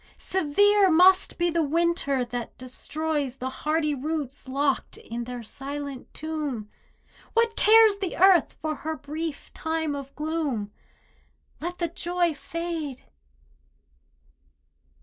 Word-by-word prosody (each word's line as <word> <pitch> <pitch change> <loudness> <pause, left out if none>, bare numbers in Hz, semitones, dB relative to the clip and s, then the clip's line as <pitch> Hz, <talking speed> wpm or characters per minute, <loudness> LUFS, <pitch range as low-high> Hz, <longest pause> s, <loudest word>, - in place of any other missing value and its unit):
Severe 390 +4 +3
must 365 +3 +5
be 345 0 +1
the 335 0 +1
winter 310 -4 +1
that 240 -1 -6
destroys 285 +1 -3
The 260 0 -4
hardy 305 +2 0
roots 285 -1 -4
locked 275 +1 0
in 235 +1 -6
their 245 -1 -6
silent 280 +2 -6
tomb. 295 -9 -4 0.6
What 460 -1 +2
cares 435 -1 +6
the 380 -3 -3
earth 370 -3 +5
for 310 0 -2
her 315 0 -4
brief 310 +1 -5
time 320 -2 -1
of 275 -1 -8
gloom 300 -9 -2 0.9
Let 350 +2 -4
the 340 - 0
joy 345 0 0
fade! 325 -3 -5
310 Hz, 115 wpm, -26 LUFS, 275-340 Hz, 0.9 s, cares